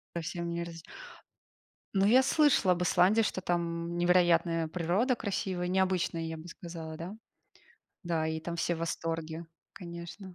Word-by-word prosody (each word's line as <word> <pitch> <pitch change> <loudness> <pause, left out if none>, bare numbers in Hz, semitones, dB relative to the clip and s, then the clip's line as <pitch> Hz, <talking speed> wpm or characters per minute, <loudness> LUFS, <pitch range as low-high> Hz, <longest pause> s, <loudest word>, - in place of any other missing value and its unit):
Совсем 170 +1 -3
не 170 0 -2
раз 165 -1 -8 1.1
Ну, 195 0 +4
я 250 +5 +6
слышала 270 -9 +4
об 180 +1 -2
Исландии, 195 +5 +4
что 195 -3 -1
там 170 -1 -2
невероятная 175 -2 +3
природа, 180 - +1
красивая, 190 -4 -2
необычная, 185 -2 +1
я 160 0 -4
бы 160 +2 -10
сказала, 165 -2 -8
да? 180 +5 -6 0.9
Да, 165 -2 0
и 160 0 -2
там 170 +1 -5
все 170 +1 0
в - - -7
восторге, 165 0 -3 0.3
конечно. 175 +2 -9
170 Hz, 145 wpm, -30 LUFS, 165-185 Hz, 1.1 s, я